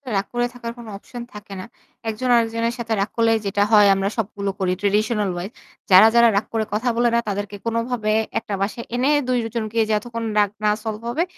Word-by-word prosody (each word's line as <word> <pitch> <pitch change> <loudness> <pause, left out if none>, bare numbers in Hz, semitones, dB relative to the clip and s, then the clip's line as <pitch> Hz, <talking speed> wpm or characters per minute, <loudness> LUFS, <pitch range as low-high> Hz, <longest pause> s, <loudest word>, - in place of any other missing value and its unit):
রাগ 195 0 0
করে 240 0 +1
থাকার 235 -1 -6
কোন 240 - -10
অপশন 240 +4 -10
থাকে 210 -1 -10
না। 185 - -6 0.4
একজন 225 +4 -3
আরেকজনের 230 0 +1
সাথে 230 -1 -2
রাগ 200 - -1
করলে 230 0 +3
যেটা 200 +1 +1
হয় 210 -2 +7
আমরা 195 0 0
সবগুলো 200 -2 -2
করি 185 -1 +1
ট্র্যাডিশনাল 210 0 +1
ওয়াইজ। 175 +4 -5 0.4
যারা, 190 +4 +9
যারা 235 0 +7
রাগ 200 - +1
করে 220 -1 0
কথা 225 +4 0
বলে 240 +1 +3
না - - +4
তাদেরকে 205 0 -4
কোনভাবে 230 -1 -1 0.3
১ 225 - -2
টা 200 - 0
বাসায় 215 +4 -3
এনে 255 +4 +2 0.2
২ 255 - +1 0.2
জনকে 225 0 -2
যতক্ষণ 230 +2 -2 0.2
রাগ 205 -1 +3
না 210 - +4
সলভ 220 0 -4
হবে 310 +8 0
220 Hz, 205 wpm, -21 LUFS, 205-235 Hz, 0.4 s, যারা